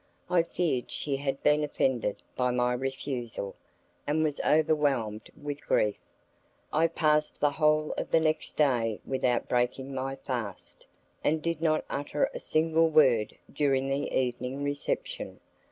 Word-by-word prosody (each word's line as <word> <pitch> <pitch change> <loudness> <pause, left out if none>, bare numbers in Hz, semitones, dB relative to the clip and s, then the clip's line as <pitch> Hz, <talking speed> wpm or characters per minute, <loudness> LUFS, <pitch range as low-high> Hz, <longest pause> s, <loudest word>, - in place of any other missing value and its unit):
I 180 -1 +5
feared 165 -6 -1
she 140 -2 -2
had 135 -1 -3
been 150 0 +4
offended 130 -7 0
by 125 0 +1
my 125 0 +1
refusal, 125 -5 -4 0.5
and 155 +2 +2
was 150 -2 0
overwhelmed 145 -9 +1
with 145 -1 -6
grief. 105 -1 +2 0.7
I 160 +2 +4
passed 150 -2 +1
the 145 0 +3
whole 155 +1 +2
of - - -4
the 165 - +4
next 155 -1 0
day 120 -7 +1
without 130 -2 0
breaking 125 +2 0
my 135 +1 -3
fast, 120 -8 -6 0.4
and 155 +2 +2
did 165 0 -2
not 155 -1 +2
utter 145 +1 -1
a - - -5
single 160 +1 +2
word 130 -9 +4 0.2
during 135 -2 +1
the 140 +1 -1
evening 125 +2 -1
reception. 145 0 -3
140 Hz, 140 wpm, -29 LUFS, 125-155 Hz, 0.7 s, I